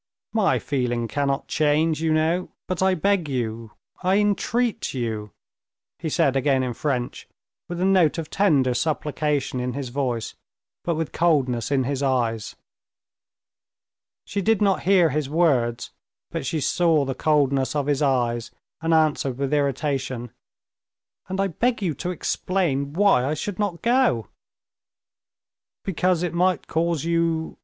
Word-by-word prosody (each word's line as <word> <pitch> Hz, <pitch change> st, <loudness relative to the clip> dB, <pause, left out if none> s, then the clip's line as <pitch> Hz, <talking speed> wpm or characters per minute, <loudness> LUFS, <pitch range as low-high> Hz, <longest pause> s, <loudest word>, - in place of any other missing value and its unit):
"My 215 Hz, -3 st, +3 dB
feeling 120 Hz, -4 st, -1 dB
cannot 140 Hz, +1 st, -1 dB
change, 155 Hz, +1 st, +1 dB
you 160 Hz, -1 st, +1 dB
know, 160 Hz, +3 st, +1 dB, 0.2 s
but 185 Hz, -1 st, -2 dB
I 190 Hz, 0 st, +3 dB
beg 185 Hz, -2 st, +1 dB
you, 115 Hz, -4 st, -3 dB, 0.3 s
I 185 Hz, +2 st, +2 dB
entreat 210 Hz, -, 0 dB
you," 110 Hz, -4 st, -3 dB, 0.7 s
he 165 Hz, -, -3 dB
said 135 Hz, -2 st, +2 dB
again 135 Hz, -1 st, +2 dB
in 125 Hz, -1 st, -2 dB
French, 125 Hz, -1 st, -3 dB, 0.4 s
with 175 Hz, 0 st, -4 dB
a 185 Hz, -, +1 dB
note 185 Hz, -5 st, +4 dB
of 160 Hz, -2 st, -5 dB
tender 145 Hz, -10 st, +3 dB
supplication 150 Hz, 0 st, -1 dB
in 125 Hz, 0 st, -2 dB
his 135 Hz, -1 st, -4 dB
voice, 125 Hz, -3 st, -2 dB, 0.5 s
but 170 Hz, -, 0 dB
with 160 Hz, 0 st, -3 dB
coldness 135 Hz, -9 st, +1 dB
in 135 Hz, -2 st, +2 dB
his 135 Hz, +1 st, -2 dB
eyes. 120 Hz, -5 st, 0 dB, 1.7 s
She 200 Hz, -, -2 dB
did 220 Hz, +1 st, +2 dB
not 200 Hz, -2 st, +2 dB
hear 180 Hz, -5 st, +5 dB
his 145 Hz, -1 st, -1 dB
words, 135 Hz, -8 st, +1 dB, 0.4 s
but 165 Hz, -5 st, -3 dB
she 155 Hz, +2 st, -1 dB
saw 160 Hz, 0 st, +2 dB
the 135 Hz, -, -2 dB
coldness 140 Hz, -2 st, +1 dB
of 145 Hz, -2 st, 0 dB
his 145 Hz, -1 st, 0 dB
eyes, 120 Hz, -4 st, +1 dB, 0.3 s
and 165 Hz, 0 st, +2 dB
answered 150 Hz, -5 st, +1 dB
with 140 Hz, +1 st, -2 dB
irritation: 135 Hz, -4 st, -1 dB, 1.0 s
"And 190 Hz, +1 st, -3 dB
I 195 Hz, -, +3 dB
beg 230 Hz, +7 st, 0 dB
you 170 Hz, -4 st, 0 dB
to 175 Hz, -, -4 dB
explain 160 Hz, -5 st, -1 dB
why 195 Hz, -8 st, +4 dB
I 145 Hz, +4 st, 0 dB
should 195 Hz, +5 st, -5 dB
not 200 Hz, -5 st, -2 dB
go." 235 Hz, -, +2 dB, 1.5 s
"Because 180 Hz, -1 st, +1 dB
it 175 Hz, -, -2 dB
might 180 Hz, +1 st, +1 dB
cause 165 Hz, -2 st, -1 dB
you...." 165 Hz, -1 st, 0 dB
150 Hz, 145 wpm, -24 LUFS, 130-175 Hz, 1.7 s, hear